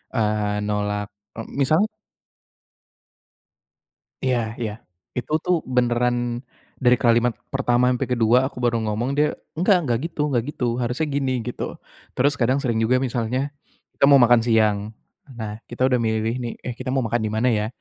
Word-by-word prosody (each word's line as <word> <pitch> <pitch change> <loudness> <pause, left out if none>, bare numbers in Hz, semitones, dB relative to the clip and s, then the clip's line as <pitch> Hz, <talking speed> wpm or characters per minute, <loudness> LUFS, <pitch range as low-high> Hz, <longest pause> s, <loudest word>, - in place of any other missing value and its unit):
eee, 105 -1 0
nolak, 105 0 -2 0.3
e - - -3 0.2
misal 155 +7 +3 2.4
Iya, 120 -4 0
ya, 110 -3 -2 0.5
itu 125 - -5
tuh 180 - +3
beneran 120 0 0 0.3
dari 125 -1 +4
kalimat 120 0 +3 0.2
pertama 125 -2 +2
sampai 125 - -1
kedua 120 -1 +3
aku 130 - -7
baru 120 -1 +2
ngomong 110 +4 -1
dia, 150 +1 +2 0.2
"Gak 185 +2 +4
gak 120 -1 +2
gitu 165 - -8
gak 120 -4 +1
gitu, 140 - -4
harusnya 125 +6 -1
gini." 135 -3 -1
Gitu, 125 +1 -5 0.5
terus 140 +3 +3
kadang 130 +2 +2
sering 115 -3 0
juga 125 +3 +3
misalnya 125 +2 -1 0.4
kita - - +1
mau 140 - +8
makan 120 -1 +6
siang, 110 -3 +3 0.6
nah 105 -1 -5
kita 125 +2 +1
udah 125 -1 +2
milih 110 0 0
nih, 120 -1 -3
"Eh 125 - -4
kita 130 0 -4
mau 135 - +1
makan 120 +1 0
di - - -2
mana 110 +3 +1
ya?" 105 -2 +1
120 Hz, 160 wpm, -23 LUFS, 110-130 Hz, 2.4 s, mau